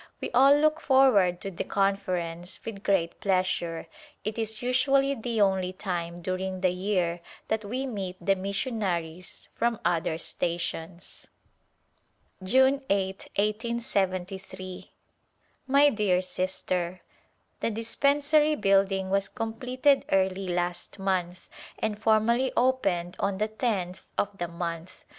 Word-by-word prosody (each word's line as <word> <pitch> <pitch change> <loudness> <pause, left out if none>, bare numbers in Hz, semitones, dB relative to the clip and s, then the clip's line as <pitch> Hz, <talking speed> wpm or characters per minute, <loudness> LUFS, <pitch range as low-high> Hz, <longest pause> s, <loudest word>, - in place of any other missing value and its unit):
We - - -4
all 275 +3 +7
look 310 +1 +3
forward 245 -10 +4
to 195 - -5
the 175 - -3
Conference 185 -3 -1
with 210 -3 -6
great 185 -5 0
pleasure; 185 -3 0 0.4
it 215 +2 -3
is 220 0 -2
usually 270 +2 +3
the 230 -2 -3
only 190 -2 +2
time 175 -2 -4
during 185 +1 -3
the 185 -1 +3
year 180 -2 -1 0.3
that 220 0 0
we 250 +6 -3
meet 195 -7 -4
the 195 - +2
mission 200 +5 -2
aries 175 -2 -4
from 235 -1 0
other 165 -2 +1
stations. 170 +1 -4 1.1
June 265 +8 +4
8, 195 -1 -1
1873. 195 -4 -2 0.8
My 280 +2 +6
dear 200 -7 +1
Sister: 185 -1 -2 0.6
The - - 0
dispensary 285 +7 +2
building 195 -3 +2
was 195 0 +2
completed 250 +4 +1
early 190 0 +1
last 175 +1 -2
month 185 -2 -2 0.3
and 215 -1 -2
formally 230 +4 +3
opened 195 -9 +1
on 200 -1 0
the 215 +2 0
tenth 205 -5 -2
of 205 0 0
the 175 - -1
month. 170 0 -6
195 Hz, 120 wpm, -27 LUFS, 180-230 Hz, 1.1 s, all